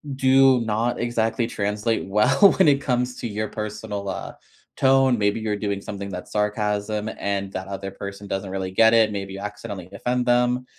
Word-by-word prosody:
do 135 -1 +5
not 115 +2 -1
exactly 115 -1 0
translate 105 0 -2
well 125 - +5
when 190 - +5
it 140 -1 +4
comes 125 -1 -1
to - - -3
your 105 0 -3
personal, 105 -2 -5
uh, - - -5 0.4
tone. 135 -2 +4
Maybe 105 +2 +1
you're 105 -1 -1
doing 100 -1 -3
something 100 -1 -6
that's 90 -1 -7
sarcasm, 105 0 -1
and 100 -1 -2
that 95 +1 -5
other 95 0 -5
person 100 +1 -8
doesn't 95 0 -3
really 95 -1 -4
get 110 +3 +5
it, 110 -2 +4
maybe 100 -1 -5
you 95 - -7
accidentally 100 -2 -7
offend 125 +5 -1
them, 125 +1 +2
105 Hz, 180 wpm, -23 LUFS, 100-120 Hz, 0.4 s, do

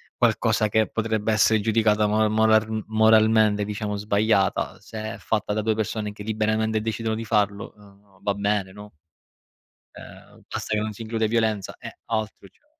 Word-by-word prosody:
qualcosa 110 - +1
che 110 +1 +2
potrebbe 110 -1 -1
essere 110 +1 +4
giudicata 105 0 +2
mor 110 +1 +2
moral 110 0 +2
moralmente, 110 -1 +4
diciamo, 105 0 -4
sbagliata 100 -2 0
se 110 +2 -7
è - - -11
fatta 105 -2 -2
da 110 - -1
2 110 +1 0
persone 105 -1 -3
che 105 - -10
liberamente 110 0 0
decidono 110 0 -2
di 115 +1 -5
farlo, 105 -2 -1
uhm, 100 -1 -21
va 100 - +1
bene, 100 -1 -1
no? 105 +1 -12 1.1
Ehm, - - -14
basta 110 - -2
che 105 - 0
non 110 0 -3
si 115 - -8
include 110 0 -1
violenza 110 -3 -1
e - - -10
altro, 110 -2 -4
cioè - - -36
110 Hz, 165 wpm, -24 LUFS, 105-110 Hz, 1.1 s, essere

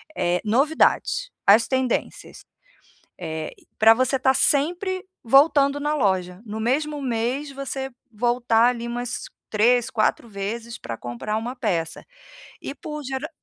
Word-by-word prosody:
eh, 175 0 +1
novidades, 310 - +2 0.2
as 220 +3 +6
tendências. 260 -2 -2 0.7
Eh, 160 -3 -5
e - - -23
para 220 +1 +8
você 255 +3 +1
estar 265 0 +3
sempre 355 +8 +1 0.2
voltando 280 +3 +4
na 295 +1 0
loja, 190 -8 0
no 215 +1 -5
mesmo 295 +6 0
mês 255 +4 -2
você 270 0 -4 0.2
voltar 240 0 +2
ali, 235 -1 -2
umas 245 0 -4 0.3
3, 235 +3 +3
4 230 +1 0
vezes 225 +4 -5
pra 115 - -6
comprar 120 - -4
uma 235 +3 -3
peça. 175 -10 -2 0.6
E - - -5
por 300 +2 -7
gerar 265 +3 -4
245 Hz, 135 wpm, -23 LUFS, 215-275 Hz, 0.7 s, para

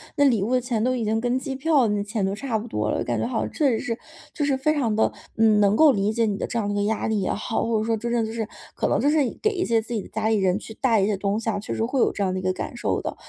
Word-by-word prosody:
那 285 - +4
礼 235 -7 +3
物 210 +5 -1
的 255 - +4
钱 240 -3 -1
都 255 +1 +1
已 235 - -2
经 220 +1 0
跟 245 +1 +1
机 270 0 -4
票 275 -3 +3
那 205 -1 0
钱 210 -1 -2
都 195 - -1
差 230 +2 -2
不 215 +2 -6
多 105 - -2
了， - - 0
感 120 -2 -1
觉 110 - 0
好 120 - -1
像 110 - -7
确 290 - +2
实 230 - +1
是 235 -2 -3 0.3
就 300 - -2
是 280 -2 +1
非 305 +4 +1
常 245 -8 0
地， 220 - +2 0.2
嗯， 220 -2 +4
能 205 0 +4
够 310 +4 +7
理 205 -3 +1
解 230 +1 +1
你 205 -2 -1
的 - - -3
这 - - -3
样 215 -3 0
的 205 - -1
一 - - -2
个 205 - +1
压 215 +1 -1
力 220 -2 0
也 185 - -1
好， 220 +2 -2
或 230 -1 +1
者 215 - 0
说 225 0 +1
真 235 +2 -4
正 235 -2 +1
就 220 - -6
是 225 -2 -3 0.3
可 - - 0
能 - - +1
就 290 - +3
是 310 - +3 0.2
给 435 - +3
一 365 -4 -1
些 230 -6 +2
自 225 +2 -6
己 220 - -1
的 - - -11
家 220 0 -2
里 220 -1 +3
人 190 -1 +2
去 220 - -9
带 230 -1 +2
一 - - +3
些 210 0 +1
东 200 +2 -1
西 230 - -7
啊， 205 - -2
确 210 - -7
实 225 - 0
会 255 +3 -1
有 - - +3
这 205 - -2
样 185 -1 0
的 185 - -2
一 - - -5
个 185 0 +1
感 185 - -5
受 240 - -1
的。 - - -5
220 Hz, 385 characters per minute, -24 LUFS, 205-245 Hz, 0.3 s, 够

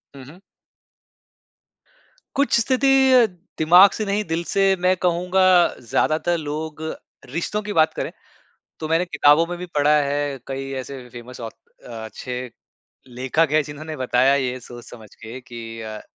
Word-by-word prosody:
हुँ, 135 - -11
हुँ। 155 +7 -14 2.0
कुछ 280 -4 +2
स्थिति 260 +4 +1 0.3
अ, 250 -2 +7 0.3
दिमाग़ 180 +5 +7
से 215 - -3
नहीं 205 +1 -1
दिल 165 +1 -2
से 195 -1 +3
मैं 180 +1 +2
कहूँगा 180 +2 +1 0.4
ज़्यादातर 155 +8 0
लोग 155 0 -5 0.5
रिश्तों 170 +9 -3
की 210 0 -5
बात 160 -3 +3
करें - - -4 0.7
तो 155 - -4
मैंने 165 +2 +2
किताबों 165 -2 +4
में 175 +1 -5
भी 180 - -6
पढ़ा 150 +1 +4
है 145 0 -2
कई 135 0 -5
ऐसे 130 -1 -10
फ़ेमस 120 +1 -11
ऑथ 115 -1 -5 0.4
अ, - - -11 0.2
अच्छे 125 +3 -6 0.6
लेखक 130 +6 0
हैं 155 0 +4
जिन्होंने 155 +2 -8
बताया 130 +1 +2
ये 130 -2 -1
सोच 120 0 -11
समझ 110 -4 -13
के 115 +3 -10
कि 115 -2 -9
अ, 110 -1 -7
150 Hz, 150 wpm, -22 LUFS, 125-175 Hz, 2.0 s, अ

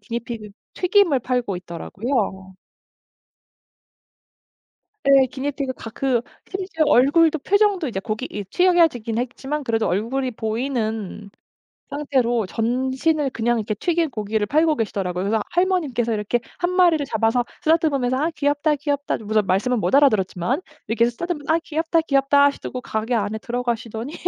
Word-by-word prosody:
기니피그 235 -2 -6 0.3
튀김을 360 -7 +3
팔고 245 -5 -1
있더라고요. 190 +2 -3 2.5
예 275 -1 +6
기니피그가 265 -2 -4
그 260 -3 +1 0.3
심지어 370 -4 -1
얼굴도 315 +5 +4
표정도 400 0 +2
이제 205 -6 -3
고기 215 +5 -4
이 205 - -4
튀겨지긴 325 - +2
했지만 265 +4 -3
그래도 225 -3 0
얼굴이 250 +8 -1
보이는 220 -3 -3 0.6
상태로 255 -6 0
전신을 260 - 0
그냥 240 0 0
이렇게 215 0 -2
튀긴 335 - 0
고기를 215 -1 -1
팔고 310 +7 +2
계시더라고요. 190 -4 -2
그래서 215 +2 +1
할머님께서 320 -11 +1
이렇게 210 +3 0 0.2
1 350 0 +1
마리를 350 -5 +4
잡아서 230 +1 +1 0.2
쓰다듬으면서 295 -6 +2
"아 305 +5 +1
귀엽다, 290 0 +1
귀엽다." 285 0 -2
그러고서 215 0 +1
말씀은 210 +6 +1
못 - - -1
알아들었지만 235 - +2 0.3
이렇게 230 +1 +2
쓰다듬으면서 315 +3 -2
"아 330 - +3
귀엽다 325 +1 0
귀엽다." 280 -2 +3
하시더 285 - -1
고 255 - -5
가게 220 +1 -3
안에 215 0 -1
들어가시더니 240 +1 -3
255 Hz, 370 characters per minute, -22 LUFS, 220-300 Hz, 2.5 s, 예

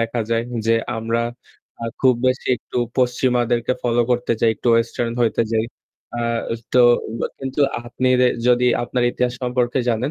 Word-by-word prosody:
দেখা 115 +1 -1
যায়। 115 0 +1 0.2
যে 115 - +4 0.2
আমরা 115 +1 -1 0.6
আ - - -2 0.2
খুব 130 -2 +5
বেশি 130 +1 0
একটু 120 - -6 0.2
পশ্চিমাদেরকে 125 -1 +1
follow 120 -1 +2
করতে 120 -1 0
চাই, 115 - +4
একটু 120 - -3
western 115 0 -1
হইতে 115 0 +2
যাই। 110 0 +1 0.5
আ - - -1 0.5
তো 125 - +6 0.3
উয়া 115 - -2
কিন্তু 135 +2 -3 0.2
আপনি 125 +2 -1
দে 125 - +5 0.2
যদি 125 0 +4 0.2
আপনার 125 +1 -1
ইতিহাস 125 0 -1
সম্পর্কে 125 0 0
জানেন 120 +5 0
120 Hz, 160 wpm, -21 LUFS, 115-125 Hz, 0.6 s, তো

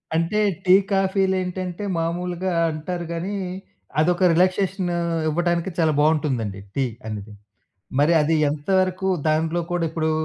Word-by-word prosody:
అంటే 170 +6 +1 0.3
టీ, 185 0 +7 0.2
కాఫీలేంటంటే 190 -1 0
మామూలుగా 175 +2 -2 0.2
అంటారు 170 +3 -4
గానీ, 175 +4 -3 0.7
అదొక 175 +3 +3
రిలాక్సేషన్ 185 +1 +1 0.4
ఇవ్వటానికి 175 +3 0
చాలా 160 -2 +3
బావుంటుందండి 140 -10 +1 0.2
టీ 135 -1 +1 0.2
అనేది. 105 -1 -6 0.7
మరి 150 +4 +4
అది 160 +2 +2 0.2
ఎంతవరకు 185 +5 0 0.2
దాంట్లో 160 +2 +1
కూడా 175 -1 0
ఇప్పుడు 160 -1 -1
175 Hz, 110 wpm, -23 LUFS, 155-185 Hz, 0.7 s, టీ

